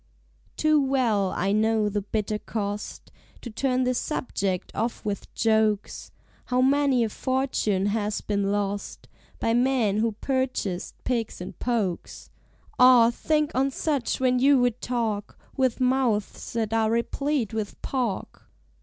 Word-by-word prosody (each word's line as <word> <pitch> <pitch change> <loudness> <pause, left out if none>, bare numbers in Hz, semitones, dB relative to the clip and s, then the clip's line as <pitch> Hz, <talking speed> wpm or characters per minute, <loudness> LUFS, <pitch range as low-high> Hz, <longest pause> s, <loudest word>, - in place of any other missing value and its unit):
Too 310 -1 +3
well 240 -8 +1
I 190 +2 -1
know 215 0 +2
the 205 0 -1
bitter 210 +1 -2
cost, 205 -1 -5 0.3
To 240 - -7
turn 255 +3 0
this 250 -1 +1
subject 195 - -2
off 230 0 -3
with 205 -1 -4
jokes; 220 -2 +1 0.4
How 250 0 0
many 270 -1 +3
a 225 - -1
fortune 255 -6 0
has 210 0 -1
been 200 -1 -1
lost 205 0 -3 0.3
By 225 - +1
men 240 -4 +2
who 225 0 +1
purchased 250 -7 -2
pigs 235 -4 -2
in 180 - -7
pokes. 220 -8 -3 0.5
(Ah! 250 -2 +7
think 300 +4 0
on 270 +2 +2
such 275 -2 -1
when 255 -1 +2
you 275 +2 +5
would 245 -1 +1
talk 225 -4 -2 0.2
With 260 -3 +1
mouths 250 -5 0
that 225 -2 -1
are 220 -1 +2
replete 235 +1 -1
with 215 -2 -4
pork!) 245 -7 -3
230 Hz, 135 wpm, -25 LUFS, 210-260 Hz, 0.5 s, Ah